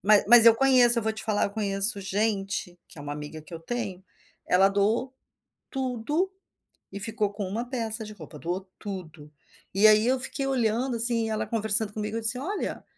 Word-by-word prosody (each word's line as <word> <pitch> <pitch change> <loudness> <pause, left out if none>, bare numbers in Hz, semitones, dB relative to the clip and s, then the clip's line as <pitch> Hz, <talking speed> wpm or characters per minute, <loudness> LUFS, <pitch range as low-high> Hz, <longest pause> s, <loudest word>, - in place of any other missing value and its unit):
Mas 210 +1 +4
mas 235 -1 +7
eu 230 - +8
conheço, 250 -2 +4
eu - - -2
vou 220 - -1
te 220 0 -8
falar, 215 -2 0
eu - - -7
conheço 200 0 0
gente, 195 -2 -2
que - - -18
é - - -9
uma 145 - -6
amiga 150 +1 -8
que 170 - -17
eu 165 - -6
tenho, 190 0 -6 0.4
ela 190 +2 +4
doou 215 +6 -1 0.6
tudo, 270 +7 -2 0.6
e 200 - -7
ficou 210 0 -2
com 205 -1 -5
uma 220 +6 -4
peça 225 -3 -2
de 215 - -9
roupa, 175 -6 -12
doou 180 +5 -5
tudo. 170 -7 -9 0.4
E 200 +3 +5
aí 215 +1 +5
eu 260 0 +1
fiquei 270 +1 -2
olhando 245 -1 -1
assim, 230 -1 +4
ela 215 - -3
conversando 220 -1 +4
comigo, 215 +1 -4
eu - - -4
disse: 225 +3 +3
"Olha, 375 +11 -5
215 Hz, 195 wpm, -26 LUFS, 195-240 Hz, 0.6 s, eu